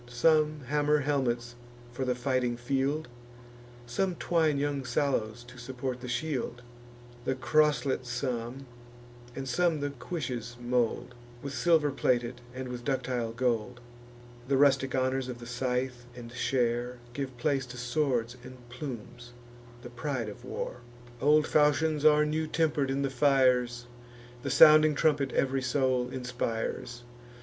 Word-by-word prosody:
Some 155 +4 +2
hammer 150 +3 +2
helmets 120 -4 -1 0.4
for 130 +2 -3
the 125 -1 0
fighting 125 -1 0
field; 135 +4 -1 0.8
Some 175 +10 -1
twine 160 -4 +1
young 140 -1 -1
sallows 120 -3 -1
to 125 +1 -13
support 125 +1 -5
the 125 - -6
shield; 120 -1 -3 0.6
The 130 - -1
croslet 135 +1 +2
some, 125 +1 -3 0.7
and 135 0 -5
some 165 +5 +1
the 145 0 -2
cuishes 125 -4 -5
mould, 120 0 -1 0.3
With 140 0 -5
silver 160 -3 +3
plated, 120 -2 0
and 130 +1 -6
with 120 -1 -6
ductile 125 -4 -1
gold. 120 0 -1 0.7
The 135 0 +2
rustic 135 -1 +3
honours 130 0 0
of 125 -1 -5
the 120 - -10
scythe 125 0 -2
and 120 -1 -9
share 120 0 0 0.2
Give 130 -2 -5
place 135 0 0
to 125 +1 -9
swords 125 -2 -1
and 130 0 -10
plumes, 120 -2 -8 0.5
the 120 - -9
pride 125 -3 -3
of 105 - -11
war. - - -5 0.4
Old 150 +2 +5
falchions 150 0 +2
are 150 0 +6
new 155 +1 -1
temper'd 150 -3 +1
in 135 +1 0
the 135 - -1
fires; 125 -3 +3 0.6
The - - -3
sounding 155 -1 +7
trumpet 145 -3 +2
ev'ry 135 0 +1
soul 130 -1 +1
inspires. 120 -1 -4
130 Hz, 135 wpm, -29 LUFS, 120-145 Hz, 0.8 s, sounding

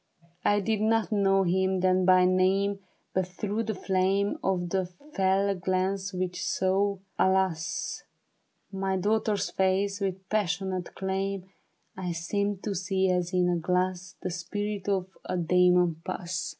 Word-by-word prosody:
I 205 0 +3
did 215 +1 0
not 225 +1 +2
know 195 -2 +3
him 190 +1 +1
then 185 0 +3
by 185 0 +6
name, 190 +2 +2 0.3
But 185 -1 0
through 210 +4 -3
the 220 -1 -2
flame 195 +2 +1
Of 180 -2 0
the 190 -2 0 0.3
fell 195 +1 +2
glance 190 +1 -1
which 180 -2 -3
sought, 195 +1 +1 0.2
alas! 190 -4 +1 0.7
My 190 -1 -1
daughter's 210 +2 0
face 195 +1 +1
with 190 -1 -3
passionate 190 -3 -1
claim, 190 0 -3 0.4
I 180 -2 -3
seemed 200 +4 -2
to 210 - -2
see 190 0 +1
as 180 -1 0
in 180 -1 +2
a 175 -1 +1
glass 180 +1 -1
The 185 - -2
spirit 205 +3 -3
of 190 -2 +1 0.2
a - - -2
demon 180 -1 +3
pass. 180 +1 -3
190 Hz, 140 wpm, -28 LUFS, 180-200 Hz, 0.7 s, by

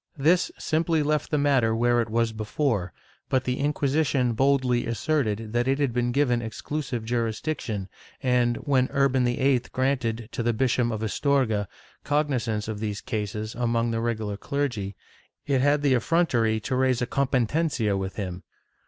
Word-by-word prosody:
^ - - -6
This 175 +4 +3
simply 160 0 +1
left 150 +1 0
the 150 - +1
matter 135 -6 +3
where 120 +1 +3
it 115 - -3
was 115 0 +1
before, 110 -3 -1 0.4
but 130 -1 +2
the 125 0 -1
Inqui 145 +1 -1
sition 135 -4 +1
boldly 130 -2 +2
asserted 115 -4 -1
that 120 +1 +1
it 135 0 +2
had 140 -4 0
been 120 0 0
given 125 -3 +2
exclusive 120 +1 -4
jm'isdiction 115 -2 -2 0.3
and, 125 -2 +2
when 130 -3 +1
Urban 135 -2 +3
VIII 130 +2 +2
granted, 125 -4 -1
to - - -3
the 120 0 +1
Bishop 125 0 +1
of 110 -1 -3
Astorga, 110 -4 +1 0.4
cogni 145 -2 +1
zance 110 -3 -2
of 110 -2 -4
these 105 -2 -3
cases 110 -2 -4
among 115 -1 0
the 115 0 -1
regular 110 -3 -2
clergy, 115 -8 -2 0.5
it 135 -3 +1
had 145 +1 +3
the 140 -2 +4
effrontery 120 -5 +2
to 130 +5 -2
raise 130 -1 +2
a - - +1
competencia 130 -3 0
with 95 0 -3
him. 95 -3 -4
120 Hz, 165 wpm, -26 LUFS, 110-140 Hz, 0.5 s, the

